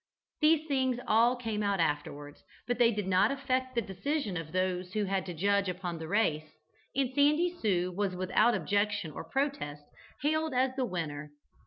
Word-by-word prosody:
These 310 0 +4
things 260 -3 +1
all 230 +3 +4
came 225 -4 -3
out 200 -2 0
afterwards, 145 -2 -2 0.2
but 245 0 -2
they 235 -1 +6
did 210 -3 -2
not 185 -1 +4
affect 260 -2 -1
the 235 - +1
decision 205 - -2
of 165 -2 -5
those 185 0 -1
who 215 - 0
had 195 0 -1
to 180 - -4
judge 200 +3 +2
upon 180 -2 -4
the 160 - -6
race, 155 -6 0 0.4
and 265 -1 0
"Sandy 300 +5 +3
Sue" 185 -4 +1
was 195 -2 -1
without 210 +6 +3
objection 205 -1 0
or - - -7
protest 270 - -2 0.4
hailed 315 -1 +1
as 260 +1 +3
the 260 -1 0
winner. 150 -7 -5
205 Hz, 175 wpm, -30 LUFS, 180-255 Hz, 0.4 s, they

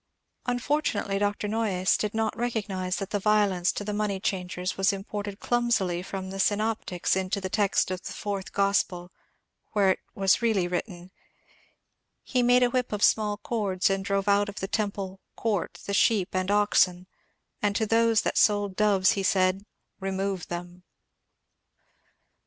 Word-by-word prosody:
Un 245 0 +1
fortunately 245 -8 -1
Dr. 205 0 -1
Noyes 205 -4 +1
did 210 0 -2
not 220 -1 0
recognize 205 -6 -2
that 195 -1 -5
the 205 - 0
violence 200 -3 +2
to - - -4
the 210 0 -3
money 205 -2 -1
changers 180 -1 -3
was 195 0 +3
imported 200 0 -5
clumsily 230 -8 +1
from 190 0 -6
the 195 - -6
synoptics 205 -3 0
into 190 +1 -1
the 190 -1 -5
text 200 -3 +1
of 185 -1 -3
the - - -7
Fourth 200 -2 -4
Gospel, 190 -3 0 0.6
where 200 -3 +4
it - - -1 0.2
was 195 +3 +3
really 215 -6 +2
written: 175 0 -5 1.2
^^He 250 -2 +1
made 245 +1 +5
a 245 - +2
whip 250 -1 -1
of 210 -1 -2
small 210 -1 +3
cords 205 -4 0
and 195 0 -1
drove 200 0 -1
out 205 0 +3
of 200 - -9
the 195 - -4
temple 200 -2 -3 0.2
(court) 200 -6 -2
the 200 - -3
sheep 200 -2 +3
and 185 0 -1
oxen, 195 -3 +3 0.6
and 205 -1 +1
to 220 - +1
those 225 0 +3
that - - 0
sold 205 -2 +2
doves 200 -3 +3 0.2
said, 190 +1 +1 0.3
remove 195 -1 -2
them." 175 +1 -7
200 Hz, 160 wpm, -27 LUFS, 190-215 Hz, 1.2 s, made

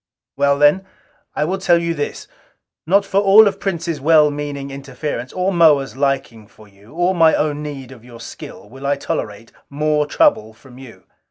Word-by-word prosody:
"Well 140 0 +1
then, 150 +7 +3 0.5
I - - 0
will 190 +4 -3
tell 180 -2 +3
you 170 0 -2
this: 145 -2 -5 0.6
not 200 +3 +3
for 195 0 0
all 205 +2 +6
of 200 0 -3
Prince's 170 -5 -4
well 150 0 +4
meaning 145 -1 -6
interference, 135 -2 -6
or 185 +1 -2
Moa's 150 -7 +3
liking 135 -6 -2
for 110 -1 -19
you, 100 +2 -21
or 175 +2 +1
my 165 -3 +4
own 150 -1 -2
need 140 -4 -8
of 120 -4 -14
your 120 -1 -14
skill, - - -11
will 135 +5 -8
I 145 - +1
tolerate 105 -5 -6 0.2
more 150 +1 -1
trouble 285 - +1
from 125 +2 -17
you. 130 -4 -14
145 Hz, 180 wpm, -18 LUFS, 135-170 Hz, 0.6 s, all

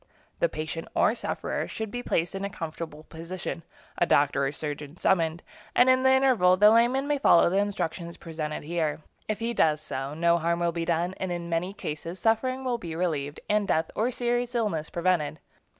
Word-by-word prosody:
The 170 - +2
patient 155 +1 -5
or - - +4
sufferer - - -3
should 220 -2 -5
be 245 - -4
placed 170 -7 -1
in 195 0 -4
a 200 - -2
comfortable 160 -3 -6
position, 170 +2 -6 0.4
a 175 - +3
doctor 140 -1 +3
or - - -2
surgeon 150 +1 -6
summoned, 165 -3 +1 0.3
and 255 +1 +6
in 255 0 +3
the 265 - +4
interval 255 -9 +4
the 210 +2 +7
layman 245 +5 +3
may 290 -1 +1
follow 170 -9 +5
the 190 - +1
instructions 175 -4 -3
presented 155 -2 -5
here. 160 -1 -1 0.3
If 215 - -1
he 230 +2 -2
does 155 -8 +3
so, 140 -1 -5
no 170 +1 +3
harm 170 +1 0
will 170 0 +1
be 165 0 -3
done, 170 +2 0
and 190 -1 -3
in 170 -1 -4
many 170 +3 -1
cases 165 -3 -6
suffering 255 +5 0
will 245 -2 0
be 165 -5 -6
relieved, 155 -4 -2
and 210 -1 +1
death 160 +1 +1
or 225 +3 +1
serious 245 0 -1
illness 200 -10 -1
prevented. 170 -4 0
175 Hz, 195 wpm, -27 LUFS, 160-215 Hz, 0.4 s, the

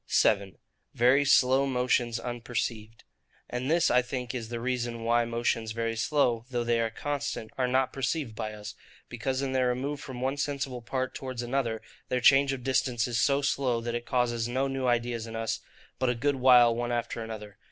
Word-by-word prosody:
7. 100 -3 +2 0.4
Very 130 +4 +4
slow 135 0 +4
motions 125 -2 +1
unperceived. 115 -2 -4 0.4
And 125 +2 -3
this, 165 +1 +3
I 125 +1 +5
think, 125 -1 -5
is 115 -3 -5
the 120 -1 -4
reason 120 -1 -2
why 120 +1 +2
motions 115 -1 -1
very 115 0 -2
slow, 120 -1 +1
though 120 -2 -1
they 120 0 +1
are 115 - 0
constant, 145 -2 -4
are 130 -1 +1
not 130 +1 +1
perceived 135 -1 -2
by 110 0 -4
us; 105 0 -8 0.4
because 130 +3 -2
in 135 - -1
their 130 -1 +2
remove 135 +4 -2
from 130 -3 -8
one 135 +2 -1
sensible 135 -3 -2
part 130 +2 -3
towards 130 -2 -5
another, 120 -3 -1 0.3
their 125 - +1
change 135 +2 +5
of 130 -2 -4
distance 125 -3 +1
is 115 -1 0
so 140 0 +2
slow, 130 -4 +1
that 120 0 -4
it 120 0 -4
causes 120 -2 0
no 130 +3 0
new 135 -1 -2
ideas 120 -1 0
in 115 - -7
us, 115 0 -2 0.4
but 130 -1 +2
a 125 - +1
good 140 +4 0
while 125 -2 +6
one 120 +1 -2
after 120 -1 -2
another. 105 -3 -8
125 Hz, 195 wpm, -28 LUFS, 115-130 Hz, 0.4 s, while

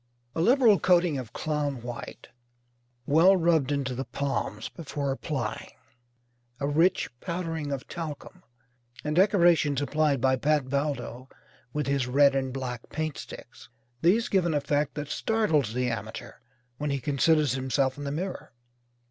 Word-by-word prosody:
A 165 - -1
liberal 230 0 +5
coating 175 -5 +3
of 120 -4 -8
clown 145 -5 -2
white, 120 -1 -8 0.8
well 170 +7 +5
rubbed 165 -5 +2
into 140 -3 -1
the 130 +2 -3
palms 135 +2 -3
before 145 -4 -4
applying; 135 -4 -4 0.9
a 140 - -1
rich 165 +6 +2
powdering 165 -3 -3
of 135 -2 -4
talcum; 165 +2 -7 0.6
and 150 0 -2
decorations 175 -7 +4
applied 145 -1 +1
by 130 +1 +2
Pat 150 +2 +2
Valdo 130 -2 -3 0.4
with 150 +2 -2
his 140 -2 0
red 140 +2 +5
and 135 -1 -1
black 125 -3 -5
paint 155 -2 -3
sticks - - -11 0.3
these 210 +7 +3
give 185 -3 +2
an 160 - 0
effect 145 0 0
that 145 -1 -5
startles 155 - +1
the 125 0 0
amateur 115 - -6 0.5
when 150 0 -2
he 140 -1 -1
considers 145 +1 +2
himself 130 0 0
in 145 - -7
the 140 - -3
mirror. 180 -1 -5
145 Hz, 145 wpm, -27 LUFS, 135-165 Hz, 0.9 s, liberal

